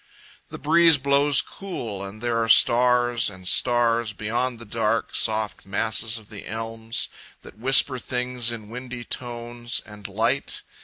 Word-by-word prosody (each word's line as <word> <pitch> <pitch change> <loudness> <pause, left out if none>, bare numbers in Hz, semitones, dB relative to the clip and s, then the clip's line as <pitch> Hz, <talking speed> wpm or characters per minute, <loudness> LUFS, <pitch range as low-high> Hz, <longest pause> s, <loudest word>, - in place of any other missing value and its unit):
The - - -7
breeze 165 0 +5
blows 140 +1 +4
cool 120 - -6
and 100 +3 -8
there 115 -1 +1
are 115 - -3
stars 120 +1 +4
and 95 -2 -10
stars 120 0 +2
Beyond 115 +4 -2
the 115 - -11
dark, 115 +1 -1
soft 110 -1 0
masses 110 +3 -1
of 110 -3 -13
the 105 -2 -9
elms 115 +1 -4 0.4
That - - -14
whisper 130 +1 +4
things 125 -1 -2
in 110 -3 -7
windy 125 0 -7
tones 120 -1 -3
and 105 -2 -10
light. 110 +7 -1
115 Hz, 145 wpm, -24 LUFS, 110-125 Hz, 0.4 s, breeze